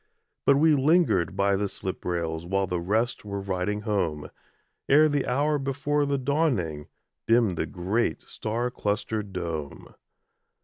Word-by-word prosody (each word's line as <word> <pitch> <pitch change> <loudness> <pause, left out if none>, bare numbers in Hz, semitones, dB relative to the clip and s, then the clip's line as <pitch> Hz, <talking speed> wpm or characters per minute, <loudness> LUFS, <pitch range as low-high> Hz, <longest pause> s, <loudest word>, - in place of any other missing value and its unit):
But 140 - +7
we 155 +2 +5
lingered 140 - +3
by 100 0 +2
the 100 +1 0
slip 95 0 -6
rails 85 -2 -2
While 95 +3 0
the 90 -2 -2
rest 110 +7 0
were 100 -1 -4
riding 100 +2 -2
home, 95 -9 -2 0.6
Ere 150 +3 +6
the 145 -3 0
hour 145 +4 +1
before 145 +2 0
the 140 0 +1
dawning, 125 - 0 0.4
Dimmed 115 -5 +3
the - - -2
great 95 +6 -1
star 115 +3 -3
clustered 105 -1 -2
dome. 80 -5 -5
105 Hz, 140 wpm, -26 LUFS, 90-135 Hz, 0.6 s, But